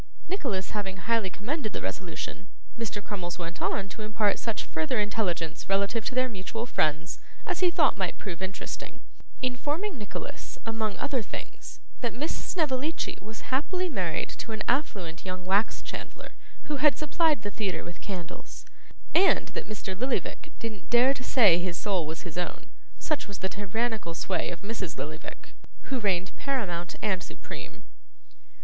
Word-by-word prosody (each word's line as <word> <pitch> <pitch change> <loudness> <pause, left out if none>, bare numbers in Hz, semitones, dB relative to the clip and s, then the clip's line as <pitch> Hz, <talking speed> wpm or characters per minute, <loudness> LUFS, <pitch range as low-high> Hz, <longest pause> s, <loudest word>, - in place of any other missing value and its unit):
Nicholas, 255 - 0
having 195 -2 -2
highly 220 +1 +2
commended 220 - -2
the - - -1
resolution, 185 +1 -3 0.3
Mr. 220 -3 -2
Crummles 180 -5 -3
went 170 0 -4
on 195 - +1
to 220 - -7
impart 215 -1 +2
such 225 -2 -1
further 160 +9 0
intelligence 195 -7 0
relative 200 +3 +3
to 255 - -1
their 255 0 +5
mutual 225 +1 -3
friends 155 -6 +1 0.3
as 365 -6 0
he 365 - +6
thought - - +4
might - - +1
prove 185 -3 -5
interesting; 190 0 -4 0.4
informing 290 - 0
Nicholas, 210 - -5
among 220 -2 0
other 265 -4 +1
things, - - -7 0.2
that 235 -3 0
Miss 295 +6 0
Snevellicci 305 -2 0
was 220 +5 -8
happily 360 +7 +2
married - - 0
to 230 - -4
an 220 - -1
affluent 195 - +1
young 185 -1 -4
wax 200 +4 +3
chandler - - -6 0.3
who 295 - -1
had 295 +1 +6
supplied 305 -4 +3
the 205 - -2
theatre 190 -6 -1
with 175 - -8
candles, 180 -5 -6 0.5
and 380 +3 +6
that - - -4
Mr. 200 -2 -3
Lillyvick 255 +7 -1
didn't 220 -4 -5
dare 245 +3 +7
to 255 - -7
say 205 -10 +7
his 175 -1 -1
soul 190 -7 +1
was 160 +1 -4
his 175 -1 -3
own, 175 - -3 0.3
such 305 -6 0
was 200 -1 -5
the 190 - -1
tyrannical 205 -2 -1
sway - - +1
of 170 0 -5
Mrs 200 -4 -3
Lillyvick, 155 +1 -6 0.4
who 265 - +2
reigned 190 -3 +1
paramount 185 -11 -1
and 190 -3 +2
supreme. - - -8
210 Hz, 160 wpm, -30 LUFS, 185-255 Hz, 0.5 s, dare